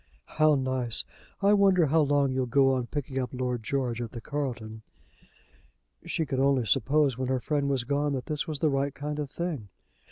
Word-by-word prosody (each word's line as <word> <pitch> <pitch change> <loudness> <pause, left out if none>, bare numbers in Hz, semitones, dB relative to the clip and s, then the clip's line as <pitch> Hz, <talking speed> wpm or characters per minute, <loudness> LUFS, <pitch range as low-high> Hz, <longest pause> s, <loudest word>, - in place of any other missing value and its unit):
"How 155 -1 +6
nice! 130 -3 +2 0.4
I 200 +1 +5
wonder 195 -4 +4
how 155 +3 +3
long 145 -2 +2
you'll 130 -1 -1
go 135 +2 +3
on 125 -2 -2
picking 135 -2 -4
up 125 -2 -2
Lord 125 -2 -2
George 120 0 -2
at 115 - -6
the 120 - -6
Carlton." 115 -5 -5 1.3
She 160 - -1
could 135 -3 -2
only 135 -3 +2
suppose, 135 +3 +2
when 130 - -1
her 130 0 0
friend 145 +1 -1
was 135 -3 +1
gone, 145 +2 0
that 130 -2 -3
this 150 +1 -3
was 155 -2 -2
the 155 +2 +1
right 135 0 -1
kind 150 +1 -4
of 145 -2 -3
thing. 150 - -4
135 Hz, 195 wpm, -27 LUFS, 125-150 Hz, 1.3 s, How